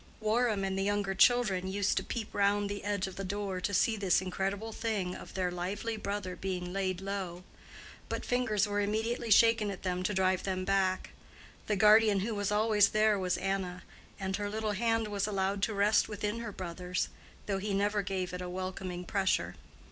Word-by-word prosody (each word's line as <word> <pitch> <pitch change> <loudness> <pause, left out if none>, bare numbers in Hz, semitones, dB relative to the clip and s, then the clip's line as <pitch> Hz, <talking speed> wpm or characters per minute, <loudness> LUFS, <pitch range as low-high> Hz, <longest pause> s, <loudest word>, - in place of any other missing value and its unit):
Warham 220 -1 +1
and 190 0 -1
the - - +1
younger 205 -1 0
children 195 -3 +3
used 200 +1 0
to - - +1
peep 225 -3 -5
round 200 0 +2
the 205 - -5
edge 205 -2 -1
of 190 - -8
the 195 - -3
door 195 -1 -3
to 200 - -1
see 220 +3 +3
this 195 -4 +2
incredible 195 +4 -3
thing 210 -5 -2
of - - -10
their 185 -2 0
lively 200 +6 -3
brother 200 -3 -4
being 180 -2 -4
laid 190 -2 -1
low; 190 -3 -4 0.7
but - - -3
fingers 225 -5 +1
were 205 0 -1
immediately 225 +3 -1
shaken 225 0 +5
at 195 - -6
them 180 -1 -1
to 185 - 0
drive 185 -1 +2
them 185 -1 -2
back. 190 -1 +1 0.6
The 210 - +1
guardian 210 0 +6
who 220 +3 -2
was 205 -1 -1
always 210 -1 +4
there 215 -1 +3
was 180 -1 0
Anna, 190 -2 -2 0.4
and 190 -1 -2
her 205 -1 -3
little 215 0 -2
hand 225 +1 +1
was 205 -1 -1
allowed 195 -1 -1
to 220 - +1
rest 205 +2 +3
within 210 +1 -3
her 230 -2 -5
brother's, 180 -1 -3 0.4
though 195 -2 -1
he 205 +2 -3
never 205 +1 +1
gave 190 -2 -3
it 180 - -4
a 180 - -4
welcoming 185 -1 -5
pressure. 190 0 0
200 Hz, 195 wpm, -31 LUFS, 185-210 Hz, 0.7 s, guardian